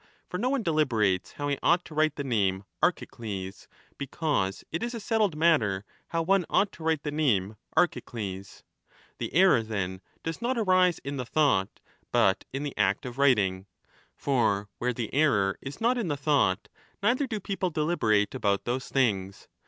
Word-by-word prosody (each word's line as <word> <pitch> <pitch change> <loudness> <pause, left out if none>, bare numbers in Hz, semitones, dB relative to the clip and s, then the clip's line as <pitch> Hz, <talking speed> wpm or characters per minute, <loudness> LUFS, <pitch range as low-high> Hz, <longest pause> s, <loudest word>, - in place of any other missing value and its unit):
For 180 - -4
no 250 +4 +1
one 270 -3 0
deliberates 115 - +1
how 145 - -4
he 140 -1 -1
ought 175 +1 +3
to - - -11
write 155 -1 +2
the 140 - -3
name 100 -7 0 0.2
Archicles, 95 -4 -2 0.3
because 140 -8 -1
it 165 - -2
is 240 +1 -3
20 - - -4
a - - -5
settled 215 -6 +1
matter 110 - +2 0.2
how 165 0 -1
one 195 +2 +3
ought 200 - +2
to 160 - -12
write 160 -2 0
the 150 - -2
name 110 -10 +1 0.2
Archi 175 +1 +3
cles. 100 -5 -7 0.6
The - - -3
error, 180 -6 +5
then, 95 -4 -4 0.2
does 165 +6 -4
not 245 +2 0
arise 185 -5 +3
in 140 +1 -4
the 130 - -2
thought, 135 -9 +1 0.3
but 95 0 +3
in 135 +2 -3
the 145 - -4
act 95 +5 +1
of 125 +1 -7
writing. 100 -9 +2 0.5
For 110 -7 +1
where 125 +1 0
the 115 -2 -5
error 110 -10 +2
is 135 +1 -7
not 245 +2 +2
in 220 - -2
the 145 -3 -1
thought, 140 -9 +1 0.4
neither 255 +6 +2
do 220 -4 -3
people 195 -1 -2
deliberate 150 -11 +1
about 100 -6 0
those 125 +2 -2
things. 100 -8 0
140 Hz, 180 wpm, -28 LUFS, 100-170 Hz, 0.6 s, error